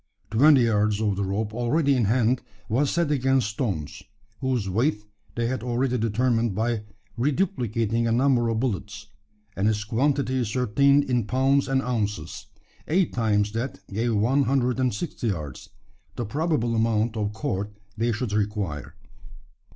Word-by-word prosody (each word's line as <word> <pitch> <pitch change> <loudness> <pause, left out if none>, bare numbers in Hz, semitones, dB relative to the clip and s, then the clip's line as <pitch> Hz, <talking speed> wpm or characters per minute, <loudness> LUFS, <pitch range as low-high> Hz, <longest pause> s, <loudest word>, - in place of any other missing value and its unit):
Twenty 135 +4 +6
yards 105 -2 +2
of 105 -3 +1
the 100 - -1
rope 105 +3 -2
already 140 +5 +2
in 120 -4 +2
hand 120 +3 +2 0.3
was 135 +6 +1
set 170 -3 0
against 130 -4 +2
stones 95 - -3 0.4
whose 130 -6 -1
weight 110 +4 0 0.3
they 120 - 0
had 130 +1 -2
already 125 +1 0
determined 115 -1 +1
by 110 0 -1 0.3
reduplicating 120 - 0
a - - +1
number 120 -1 +3
of 115 -1 0
bullets 105 -3 -3 0.5
and 100 +2 +1
its 105 -1 -1
quantity 130 +4 0
ascertained 130 +4 +3
in 125 -5 -1
pounds 135 +3 +2
and 135 0 +1
ounces. 105 -9 -3 0.4
Eight 180 +2 +1
times 105 -3 +1
that 115 -3 -4
gave 115 +2 0
one 130 +7 +2
hundred 125 -2 +1
and 130 -1 +2
sixty 120 +1 -4
yards 75 - -4 0.5
the 120 - -3
probable 140 -1 0
amount 110 0 +1
of 105 -2 -1
cord 105 -2 -3 0.3
they 115 +2 0
should 115 -1 -3
require. 100 -8 -2
115 Hz, 150 wpm, -25 LUFS, 105-130 Hz, 0.5 s, Twenty